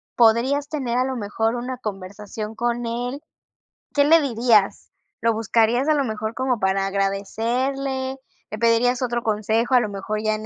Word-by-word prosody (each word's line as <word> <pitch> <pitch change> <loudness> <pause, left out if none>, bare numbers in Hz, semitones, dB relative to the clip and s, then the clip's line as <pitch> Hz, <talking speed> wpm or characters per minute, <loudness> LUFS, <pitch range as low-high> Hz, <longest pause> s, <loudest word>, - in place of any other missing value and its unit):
podrías 245 +5 +3
tener 255 -6 -2
a 255 - +2
lo 265 0 -3
mejor 225 +1 -1
una 250 +1 -4
conversación 210 0 -6
con 240 +1 -1
él? 245 +4 -3 0.7
¿Qué 285 - +4
le 320 +2 +6
dirías? 230 -6 +2 0.3
¿Lo 230 - +3
buscarías 230 +4 +2
a 310 - +4
lo 290 -2 +1
mejor 220 -2 -3
como 255 -3 0
para 190 0 +1
agradecerle? 250 +7 -1 0.3
¿Le 215 - -4
pedirías 235 +2 +3
otro 240 -2 -1
consejo, 220 +3 +1
a - - +7
lo 220 -3 -2
mejor, 205 +2 -4
ya 215 0 +1
en 215 0 -7
235 Hz, 165 wpm, -22 LUFS, 215-255 Hz, 0.7 s, a